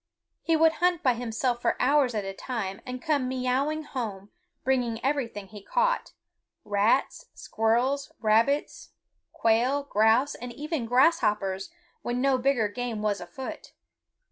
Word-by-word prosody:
He 330 - +1
would 320 0 +5
hunt 355 -2 +2
by 255 - +4
himself 240 +1 -2
for - - 0
hours 265 -2 +3
at 210 -2 -2
a 195 - -4
time, 195 -3 -4
and 250 0 -6
come 285 -4 +1
meowing 260 +4 -1
home, 210 -9 -6 0.3
bringing 245 -4 0
everything 235 -8 -2
he 210 0 -10
caught, - - 0 0.5
rats, 210 +6 +1
squirrels, 250 +7 0
rabbits, 230 +6 +1 0.4
quail, 240 +5 +2
grouse, 225 +3 +3
and 245 0 -7
even 295 -2 -3
grasshoppers 210 - +2 0.3
when 240 +1 -2
no 265 0 +2
bigger 250 -4 +2
game 225 0 -4
was 205 -2 0
afoot. 175 +10 -8
245 Hz, 135 wpm, -27 LUFS, 220-275 Hz, 0.5 s, would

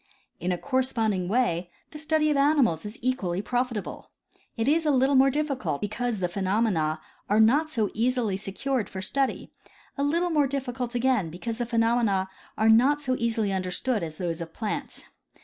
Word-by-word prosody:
In 180 +2 -1
a 180 - 0
corresponding 225 -7 0
way 185 -6 0 0.2
the 300 - -8
study 310 0 +1
of - - +1
ani 290 +1 +4
mals 170 -6 +1
is 210 - -9
equally 200 -9 -1
profitable. 245 -1 -3 0.5
It 225 +2 -1
is 320 +3 +3
a 305 - +1
little 270 0 +3
more 270 0 +6
difficult 275 - -2
because 220 +3 -2
the 180 -2 0
phenomena 185 -4 0 0.3
are 210 +2 +3
not 280 +9 +4
so 220 -9 -1
easily 235 -3 0
secured 210 +5 -2
for 190 - -6
study, 270 +7 -1 0.5
a - - +1
little 340 +5 +1
more 295 -3 +3
difficult 255 -3 -4
again 240 -8 +1
because 225 +8 -5
the 240 - -1
phenomena 225 -5 +1 0.3
are 220 - +2
not 260 +7 +5
so 255 -2 +1
easily 225 -4 0
under 185 -1 -2
stood 230 +4 -1
as 160 -2 -5
those 170 -2 -3
of 165 -1 -8
plants. 215 -3 -4
235 Hz, 180 wpm, -26 LUFS, 195-265 Hz, 0.5 s, more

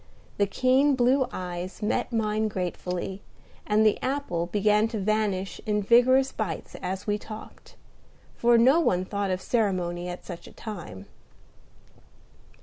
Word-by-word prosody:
The 200 - +2
keen 260 +6 +3
blue 255 +1 +3
eyes 180 +2 -6
met 210 - 0
mine 215 -1 0
gratefully, 180 0 -4 0.5
and 215 +1 +3
the 215 - +3
apple 255 -11 -2
began 210 +3 +2
to 225 -2 -4
vanish 200 -2 -1
in 210 -1 +1
vigorous 255 +5 +5
bites 190 -8 -4
as 185 +1 -4
we 210 0 0
talked; 215 0 -11 0.6
for 235 0 +4
no 260 +8 +5
one 185 - +1
thought 200 0 -2
of 185 0 -2
ceremony 180 -6 0
at 175 - -7
such 175 -2 -8
a - - -14
time. 175 - -8
210 Hz, 140 wpm, -26 LUFS, 185-235 Hz, 0.6 s, vigorous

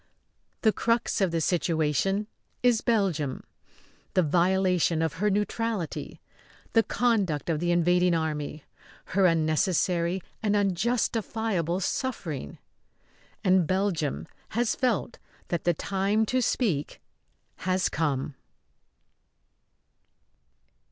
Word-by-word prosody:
The 220 -2 +4
crux 230 -2 0
of 190 - +3
the 165 0 -1
situation 165 +4 +1 0.4
is 245 -3 +4
Belgium 185 - 0 0.7
the 185 - +4
violation 180 +1 +2
of 160 - -1
her 210 - +3
neutrality; 210 -2 -2 0.5
the 225 - +6
conduct 200 - 0
of 155 - -1
the 175 +1 -1
invading 175 +1 +3
army; 155 -2 -3 0.5
her 190 0 +5
unnecessary 170 +2 +1 0.2
and 210 -1 +1
unjustifiable 205 -2 0
suffering. 175 - -3 0.9
And 185 -3 +4
Belgium 185 -7 -1 0.3
has 240 -1 +2
felt 245 -2 -1 0.3
that 170 - -2
the 175 - +4
time 200 +5 0
to 255 +4 0
speak 190 - 0 0.6
has 185 +1 0
come. 145 -3 -1
185 Hz, 100 wpm, -27 LUFS, 165-210 Hz, 0.9 s, the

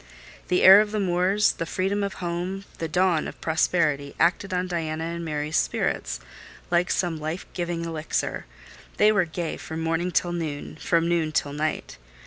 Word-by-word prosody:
The 180 - +2
air 195 +2 +10
of 215 - -1
the 215 - -1
moors, 190 +2 +2
the 165 - -4
freedom 195 +4 -1
of 200 -2 -3
home, 180 +2 -3 0.2
the 165 - -2
dawn 180 -1 +2
of - - -9
prosperity, 155 -3 +1
acted 175 +4 +2
on 180 0 0
Diana 160 -3 -3
and 170 +1 -4
Mary's 150 -1 -2
spirits - - -1 0.5
like 175 +1 +2
some 170 -3 0
life 155 +4 -4
giving 170 -1 -3
elixir: 160 - -3 0.5
they 210 +1 +6
were 200 -4 +3
gay 165 0 -4
from 160 0 -6
morning 165 +2 0
till 175 0 +1
noon, 160 -4 -4
and - - -14
from 165 -1 +2
noon 170 -2 +1
till 145 -1 0
night. 150 - -3
170 Hz, 175 wpm, -25 LUFS, 160-180 Hz, 0.5 s, air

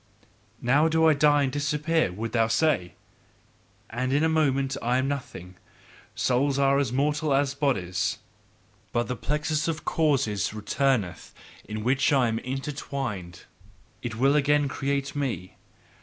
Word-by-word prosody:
'Now 140 +6 +3
do 160 0 +2
I 160 - +6
die 145 0 +4
and 135 - 0
disappear,' 150 - 0
wouldst 110 +4 -5
thou 115 -1 +3
say, 115 - +1 1.0
'and 125 +3 -2
in 145 +3 +2
a - - +4
moment 135 -4 +1
I 120 +2 +1
am 130 +1 0
nothing. 115 -11 -6 0.6
Souls 135 +2 +1
are 140 0 +3
as 140 -5 0
mortal 145 +2 +1
as 140 0 +1
bodies. 125 - -1 0.8
But 120 0 0
the 125 - -2
plexus 150 +4 -1
of 155 -1 -3
causes 125 -10 +1
returneth 105 - -1 0.3
in 105 0 -5
which 130 +5 +2
I 135 -4 +3
am 115 0 -1
intertwined, 130 - -5 0.6
it 120 -3 -4
will 135 +5 +3
again 145 0 +3
create 140 +1 -2
me! 115 - -3
135 Hz, 140 wpm, -26 LUFS, 115-145 Hz, 1.0 s, I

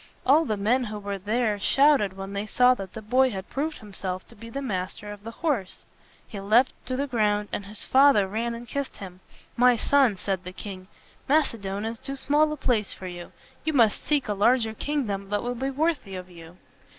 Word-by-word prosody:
All 300 +5 +5
the 215 -5 -1
men 240 +6 +2
who 210 -1 -5
were 200 -1 -4
there 215 +1 0
shouted 270 -6 +3
when 195 +1 -6
they 200 +1 -3
saw 250 +3 +5
that 195 -6 -7
the 220 - -8
boy 255 +4 +3
had 195 -3 -6
proved 300 +3 -2
himself 190 -3 -6
to 235 - -15
be 230 +2 -11
the 275 - -4
master 205 -4 -4
of 205 0 -10
the 225 - -6
horse. 230 - -2 0.4
He 205 - -7
leaped 220 +6 +3
to 255 - -1
the 275 +2 0
ground, 210 -5 0
and 200 - -4
his 210 +1 -4
father 265 -7 +5
ran 230 +4 -2
and 235 +1 -9
kissed 280 +4 -4
him. 185 -2 -9 0.4
"My 250 0 +5
son," 260 -4 +3
said 190 -1 -2
the 180 0 -8
king, 185 -1 -8 0.4
"Macedon 220 -9 +1
is 225 +1 -4
too 275 +1 -5
small 300 +3 +2
a 305 - -3
place 225 -7 0
for 190 - -10
you. 175 -1 -7 0.3
You 315 - -1
must 230 -6 +3
seek 295 -3 +1
a 210 - 0
larger 225 +2 +3
kingdom 215 -7 -2
that 205 +2 -1
will 245 +1 -2
be 265 +3 -2
worthy 285 - -1
of 185 0 -8
you." 170 0 -13
220 Hz, 210 wpm, -26 LUFS, 200-260 Hz, 0.4 s, All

